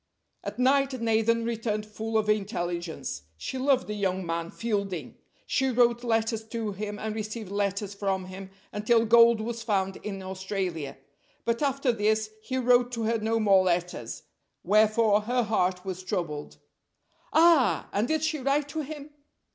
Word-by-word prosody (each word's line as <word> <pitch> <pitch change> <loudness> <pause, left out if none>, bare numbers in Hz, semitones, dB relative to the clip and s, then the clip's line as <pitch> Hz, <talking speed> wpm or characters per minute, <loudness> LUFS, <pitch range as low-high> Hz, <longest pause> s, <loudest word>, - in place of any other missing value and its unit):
At - - -5
night 270 +1 +2
Nathan 230 0 +2
returned 220 -2 -2
full 220 +1 -3
of 215 -1 +1
intelligence. 175 -5 -2 0.2
She 260 - -5
loved 265 -1 +2
the 210 - -4
young 190 -3 -1
man 165 0 -2
Fielding. 200 -6 -3 0.3
She 265 -1 +1
wrote 240 -1 +3
letters 225 -1 0
to 225 -2 -3
him 205 +1 -5
and 215 0 -3
received 215 -1 -5
letters 200 0 -1
from 195 -2 -2
him, 190 +1 -9 0.2
until 225 +2 +3
gold 235 0 +6
was 230 +1 -4
found 195 -4 0
in 195 -2 -6
Australia. 185 -6 -4 0.5
But 235 +2 0
after 275 -2 +1
this 215 -1 +1
he 260 +4 -3
wrote 245 -1 +4
to 230 -1 -2
her 225 +1 +1
no 225 +1 0
more 195 -3 +5
letters, 175 -9 -2 0.4
wherefore 215 +1 +4
her 245 +3 0
heart 185 -4 0
was 185 -1 -4
troubled. 170 -6 -4 0.7
"Ah! 325 -5 +4
and 210 +4 +1
did 315 +1 0
she 315 -1 0
write 280 +2 0
to 310 +2 -3
him?" 300 0 -8
215 Hz, 155 wpm, -27 LUFS, 195-235 Hz, 0.7 s, gold